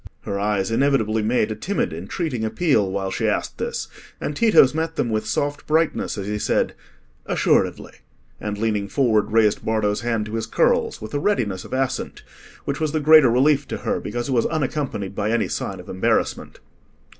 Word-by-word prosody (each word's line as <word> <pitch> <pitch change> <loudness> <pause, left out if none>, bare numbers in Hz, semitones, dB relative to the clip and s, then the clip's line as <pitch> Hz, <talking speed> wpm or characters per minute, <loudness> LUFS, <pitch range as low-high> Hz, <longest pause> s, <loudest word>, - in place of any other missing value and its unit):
Her 100 0 -4
eyes 100 -1 0
inevitably 115 -4 +2
made 110 0 +1
a - - -3
timid 185 - -2
entreating 115 - -3
appeal 110 - +1
while 95 0 -2
she - - -1
asked - - -2
this, - - -3 0.3
and 150 - -3
Tito's 210 - +5
met 160 +1 -2
them 120 - -1
with 110 0 -1
soft 145 +7 -2
brightness 160 -6 +1
as 100 - -4
he 105 +1 -3
said, - - 0 0.5
"Assuredly," - - +1 0.5
and, 105 -1 -4
leaning 105 -2 -1
forward, 110 -3 +2
raised 110 -1 +3
Bardo's 105 -2 0
hand 115 -3 -1
to 105 - -8
his 110 0 -2
curls, 110 - +1
with 110 - -8
a 145 - 0
readiness 115 - -1
of - - -9
assent, 130 0 -2 0.4
which 140 - -2
was 155 -1 -1
the 155 - +1
greater 155 -3 +7
relief 135 +4 +3
to - - -4
her, - - -2
because 120 0 -4
it - - -3
was 115 - +2
unaccompanied 135 -10 -2
by 100 +1 -1
any 115 -1 +1
sign - - -4
of - - -11
embarrassment. 95 - -1
115 Hz, 185 wpm, -22 LUFS, 105-145 Hz, 0.5 s, greater